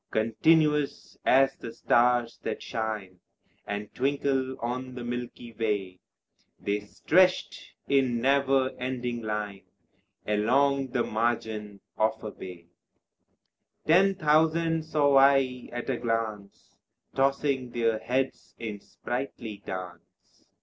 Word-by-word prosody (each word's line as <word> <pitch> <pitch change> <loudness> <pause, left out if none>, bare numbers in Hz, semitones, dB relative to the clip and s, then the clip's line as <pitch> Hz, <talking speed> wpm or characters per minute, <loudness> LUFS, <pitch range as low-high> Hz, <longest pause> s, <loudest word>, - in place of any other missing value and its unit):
Continuous 150 +6 +2
as 135 +1 +5
the 115 - -8
stars 120 0 +2
that 110 - -4
shine 105 -5 -4 0.5
And 105 0 -5
twinkle 135 -1 0
on 125 +2 -4
the 125 - -6
milky 120 -1 -6
way, 100 -5 -2 0.6
They 100 +1 -1
stretched 180 - +1
in 130 -4 +2
never 135 0 +2
ending 125 -1 -3
line 105 -2 -4 0.6
Along 135 +6 +2
the 120 -1 0
margin 110 -2 -2 0.2
of 110 0 +1
a 105 - -5
bay: 90 -4 -10 1.2
Ten 190 +5 +5
thousand 160 0 +2
saw 145 -3 +3
I 135 -2 +3
at 120 0 -5
a 130 -3 0
glance 110 -4 -4 0.4
Tossing 135 -1 +1
their 115 -2 0
heads 130 +3 -2
in 110 -3 -5
sprightly 120 -2 -6
dance. 90 -2 -9
120 Hz, 110 wpm, -28 LUFS, 110-135 Hz, 1.2 s, as